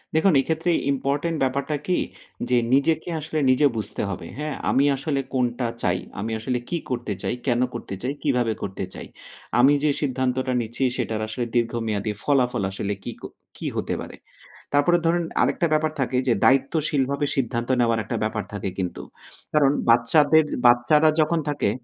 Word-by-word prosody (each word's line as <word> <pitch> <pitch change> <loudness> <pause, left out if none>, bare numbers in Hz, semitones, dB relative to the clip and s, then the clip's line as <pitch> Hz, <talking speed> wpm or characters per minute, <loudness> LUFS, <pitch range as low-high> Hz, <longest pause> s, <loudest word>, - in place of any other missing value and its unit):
দেখুন 170 +3 +4
এক্ষেত্রে 160 +5 -1 0.2
ইম্পোর্টেন্ট 140 +4 -1
ব্যাপারটা 140 +3 -1
কি? 180 - +2 0.5
যে 125 - +4 0.2
নিজেকে 155 +5 +2
আসলে 155 +1 -3
নিজে 130 +3 +5
বুঝতে 105 -1 -3
হবে, 85 -4 -5
হ্যাঁ? 150 -1 -3
আমি 140 - +3
আসলে 135 +1 -2
কোনটা 125 -1 0 0.2
চাই? 90 0 +1 0.2
আমি 110 +3 -3
আসলে 125 +2 -1
কি 175 - 0
করতে 120 -4 -2
চাই? - - -1
কেন 120 0 +2
করতে 115 -4 -6
চাই? 135 - -1
কিভাবে 125 -6 +1
করতে 95 0 -4
চাই? - - -8 0.5
আমি 135 +4 +6
যে 150 - +3
সিদ্ধান্তটা 130 -2 0
নিচ্ছি 120 +3 -4
সেটার 115 -3 -2
আসলে 120 +3 -3
দীর্ঘমেয়াদী 115 -3 0
ফলাফল 125 -7 +1
আসলে 100 +1 -3
কি - - -4
ক - - -23 0.3
কি - - -7
হতে - - -2
পারে? - - -8 0.6
তারপরে 145 +5 +4
ধরুন 170 +1 +2 0.2
আরেকটা 170 - +2
ব্যাপার 155 0 +2
থাকে 130 -1 0
যে 120 - +4
দায়িত্বশীলভাবে 140 +1 +2
সিদ্ধান্ত 120 -2 -1
নেওয়ার 115 -2 +2
একটা - - -3
ব্যাপার 110 -1 -2
থাকে 100 -1 -3
কিন্তু। 90 -2 -3 0.5
কারণ 145 -3 +4 0.2
বাচ্চাদের 145 +7 +5 0.2
বাচ্চারা 120 +6 +5
যখন 160 +2 +1
থাকে 145 - 0
130 Hz, 160 wpm, -24 LUFS, 115-150 Hz, 0.6 s, আমি